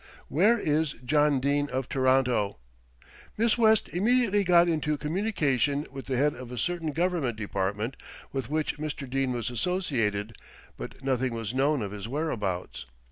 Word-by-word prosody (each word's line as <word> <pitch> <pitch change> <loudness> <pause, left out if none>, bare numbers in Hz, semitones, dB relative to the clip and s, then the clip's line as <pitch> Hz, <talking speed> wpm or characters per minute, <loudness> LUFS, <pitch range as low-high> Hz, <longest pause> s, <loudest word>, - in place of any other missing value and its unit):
~WHERE 210 +10 +4
IS 155 -6 0
JOHN 150 +1 +3
DENE 145 +2 +1
OF 130 -1 -2
TORONTO?~ 130 - +2 0.8
"Miss 225 +1 +3
West 220 -2 +4
immediately 210 +1 +2
got 175 -1 +5
into 150 -2 0
communication 150 - 0
with 135 -1 -8
the 130 -2 -1
head 145 +3 +3
of 125 0 -9
a 125 - -6
certain 165 +5 -1
Government 165 -8 0
department 105 +3 -2 0.4
with 135 -3 -3
which 155 0 -1
Mr. 150 -2 -4
Dene 135 0 0
was 120 0 -2
associated; 115 - -1 0.4
but - - -9
nothing 130 -2 0
was 115 -1 -4
known 135 -1 +2
of 100 - -4
his 105 0 -6
whereabouts. 110 - -3
140 Hz, 150 wpm, -28 LUFS, 120-160 Hz, 0.8 s, got